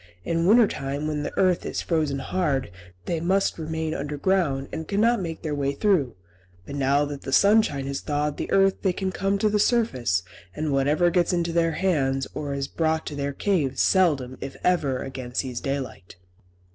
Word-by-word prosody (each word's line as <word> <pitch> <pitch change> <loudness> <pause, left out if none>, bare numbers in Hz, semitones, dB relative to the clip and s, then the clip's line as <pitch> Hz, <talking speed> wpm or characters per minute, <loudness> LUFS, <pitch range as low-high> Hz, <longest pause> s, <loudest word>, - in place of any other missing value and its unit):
In 165 +1 0
winter 225 +2 +6
time 140 -1 -4
when 150 -1 -2
the - - -3
earth 185 -2 +3
is - - -3
frozen 155 -5 0
hard, 135 - -1 0.3
they 170 - -1
must 190 +2 +1
remain 160 0 -3
underground, 145 -1 0
and 160 -1 -5
cannot 225 +2 +2
make 165 -2 -5
their 155 -2 -2
way 140 -1 -1
through; 145 - +1 0.5
but - - -8
now 140 +1 +2
that 145 -1 -6
the 135 - -6
sunshine 200 -6 +4
has 140 0 -3
thawed 150 0 -1
the - - -4
earth 195 0 +3
they 190 -3 +1
can 190 +1 -2
come 195 +2 0
to 215 - +2
the 210 0 +1
surface, 130 - +1 0.3
and 155 -2 -1
whatever 150 +6 +2
gets 175 +1 +2
into 170 -1 0
their 165 -1 +2
hands, 135 -7 0
or 145 -2 -4
is 140 -1 -2
brought 160 -1 -1
to 150 - -5
their 140 0 -2
caves, 150 -3 0
seldom, 145 -9 +2
if 135 - -6
ever, 145 -8 +1
again 130 -2 -7
sees 125 -3 -2
daylight." 130 -9 -5
155 Hz, 185 wpm, -25 LUFS, 135-180 Hz, 0.5 s, winter